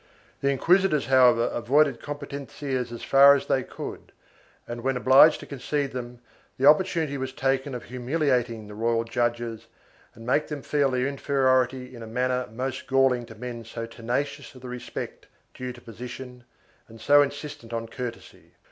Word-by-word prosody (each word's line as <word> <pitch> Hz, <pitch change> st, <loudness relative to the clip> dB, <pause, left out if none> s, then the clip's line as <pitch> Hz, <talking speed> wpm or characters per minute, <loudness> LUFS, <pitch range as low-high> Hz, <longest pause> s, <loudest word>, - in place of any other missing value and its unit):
3 140 Hz, -, -1 dB
The 140 Hz, -, +3 dB
inquisitors 170 Hz, 0 st, +3 dB
however 125 Hz, -3 st, +5 dB
avoided 135 Hz, +2 st, +2 dB
competencias 140 Hz, -3 st, -5 dB
as 120 Hz, -, -8 dB
far 140 Hz, +1 st, +7 dB
as 140 Hz, -, -2 dB
they 130 Hz, -, +1 dB
could -, -, -8 dB, 0.6 s
and, 120 Hz, 0 st, -6 dB
when 130 Hz, +1 st, 0 dB
obliged 130 Hz, +5 st, +6 dB
to -, -, -9 dB
concede 140 Hz, +1 st, -3 dB
them, 125 Hz, -1 st, -7 dB, 0.4 s
the 130 Hz, -, +1 dB
opportunity 155 Hz, -2 st, +3 dB
was 130 Hz, 0 st, -3 dB
taken 135 Hz, 0 st, -1 dB
of 120 Hz, -, -6 dB
humiliating 125 Hz, -3 st, -1 dB
the 105 Hz, -, -10 dB
royal 115 Hz, +2 st, 0 dB
judges 115 Hz, -1 st, -2 dB, 0.5 s
and 115 Hz, -, -12 dB
make 135 Hz, +5 st, +1 dB
them 150 Hz, -3 st, -6 dB
feel 145 Hz, -2 st, +1 dB
their 125 Hz, -1 st, 0 dB
inferiority 130 Hz, -2 st, +1 dB
in 115 Hz, -, -10 dB
a 115 Hz, -, -8 dB
manner 125 Hz, +2 st, -1 dB
most 130 Hz, +3 st, -4 dB
galling 130 Hz, -3 st, +2 dB
to 115 Hz, -, -11 dB
men 120 Hz, 0 st, -7 dB
so 115 Hz, +1 st, -6 dB
tenacious 125 Hz, +5 st, -4 dB
of 130 Hz, -, -13 dB
the 125 Hz, -, -7 dB
respect 125 Hz, 0 st, -7 dB, 0.3 s
due 125 Hz, 0 st, -5 dB
to 120 Hz, -, -12 dB
position 125 Hz, +2 st, -9 dB, 0.4 s
and 115 Hz, 0 st, -14 dB
so 145 Hz, +5 st, +6 dB
insistent 145 Hz, -4 st, -4 dB
on 115 Hz, 0 st, -3 dB
courtesy. 120 Hz, 0 st, -8 dB
130 Hz, 165 wpm, -26 LUFS, 120-140 Hz, 0.6 s, far